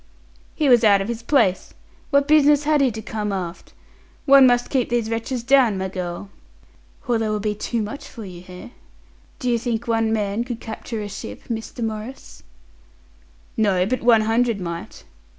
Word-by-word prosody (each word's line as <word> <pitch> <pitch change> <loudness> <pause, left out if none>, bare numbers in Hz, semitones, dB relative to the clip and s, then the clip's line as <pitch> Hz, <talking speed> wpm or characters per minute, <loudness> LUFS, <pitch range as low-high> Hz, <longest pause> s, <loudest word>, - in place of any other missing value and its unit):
"He 305 - +1
was 240 -3 +5
out 200 -2 +6
of 195 - -3
his 235 -1 -4
place. 230 -7 +1 0.3
What 280 -1 +3
business 295 -1 +5
had 300 -1 +2
he 270 - +4
to 220 -1 -7
come 210 -1 -3
aft? 180 -3 -6 0.5
One 275 -2 +8
must 245 0 +1
keep 260 -4 +1
these 235 -2 -1
wretches 230 +2 -3
down, 255 -5 +4
my 190 0 -3
girl." 180 +1 -6 0.8
"Or 240 -2 +1
they 220 -1 -1
will 215 0 -1
be 210 0 -1
too 220 +2 -3
much 280 +8 -7
for 225 - -10
you, 180 -2 -10
eh? 180 +3 -10 0.7
Do 250 - -5
you 240 -1 +2
think 235 0 -3
one 225 -1 +1
man 210 0 -1
could 240 -2 -6
capture 225 -1 -6
a - - -5
ship, 155 - -8
Mr. 225 +1 -4
Maurice?" 220 +4 -7 1.1
"No, 195 -4 +2
but 255 +6 -2
one 230 -2 +5
hundred 225 0 +1
might." 170 -2 -7
225 Hz, 180 wpm, -22 LUFS, 205-245 Hz, 1.1 s, One